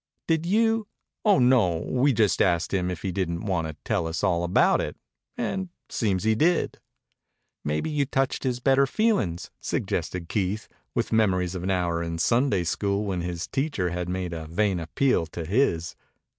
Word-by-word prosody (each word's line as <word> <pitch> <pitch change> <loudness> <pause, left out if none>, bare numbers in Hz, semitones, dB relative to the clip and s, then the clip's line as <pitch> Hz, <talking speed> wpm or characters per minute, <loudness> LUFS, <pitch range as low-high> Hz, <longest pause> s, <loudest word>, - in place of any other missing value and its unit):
"Did 165 0 +1
you 225 +2 +2 0.2
?" - - -61
"Oh, 205 -2 +6
no! 125 -10 +4
We 130 +3 +3
just 110 -5 +2
asked 85 -1 +2
him 90 -2 +1
if 90 -3 -5
he 95 - -1
didn't 85 +1 -2
want 90 -5 0
to 80 - -7
tell 85 - 0
us 80 +4 -3
all 85 -3 +2
about 85 +1 +3
it, - - -4 0.4
and 190 -1 -2 0.2
it - - -26
seems 100 -4 0
he 110 0 +3
did." 165 +9 +1 0.8
"Maybe 75 - -1
you 145 -2 +1
touched 135 -1 -1
his 125 -2 -1
better 135 +2 +4
feelin's," 130 - 0
suggested 90 -2 -2
Keith, 100 +3 -1 0.3
with 115 -1 -1
memories 90 -5 +2
of 90 - -4
an 95 - -2
hour 90 -3 0
in 85 0 -3
Sunday 115 +1 +2
School 100 +4 -1
when 95 -3 -2
his 85 -1 -3
teacher 135 - -1
had 90 0 -3
made 90 -1 -3
a 80 -1 -6
vain 95 +2 +1
appeal 85 +2 +1
to 80 +1 -6
his. 85 - +1
95 Hz, 185 wpm, -26 LUFS, 85-130 Hz, 0.8 s, Oh